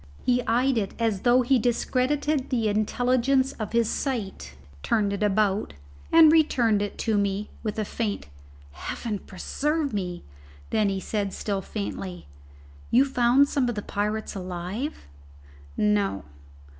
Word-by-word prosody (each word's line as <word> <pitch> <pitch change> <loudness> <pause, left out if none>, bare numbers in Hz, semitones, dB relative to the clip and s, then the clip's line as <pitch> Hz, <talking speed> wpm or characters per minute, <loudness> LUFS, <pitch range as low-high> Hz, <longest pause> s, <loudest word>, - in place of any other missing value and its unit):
He 250 0 +2
eyed 245 +2 +2
it 200 - -4
as 225 -4 0
though 250 +1 +4
he 255 +1 +3
discredited 260 +4 0
the 235 -4 +1
intelligence 250 +5 +2
of 215 -2 -4
his 235 -1 +2
sight, 200 - -3 0.3
turned 205 - +1
it 200 - -4
about, 210 - +1 0.4
and 325 -2 +8
returned 240 -10 +3
it 205 - -4
to 220 -3 +2
me 200 +1 -1
with 215 -2 -3
a 215 - -1
faint 210 -1 -3 0.5
"Heaven 205 - -4
preserve 290 - -2
me!" 180 -3 -3 0.5
Then 215 -1 +2
said 205 +1 -2
he, - - -7
still 200 -2 -2
faintly, 195 -2 -5 0.6
"You 255 +4 +5
found 260 +1 +4
some 270 -4 0
of 240 - -3
the 210 - -4
pirates 210 +2 -2
alive?" 185 - -5 0.7
"No." 100 -2 +1
220 Hz, 140 wpm, -26 LUFS, 200-255 Hz, 0.7 s, and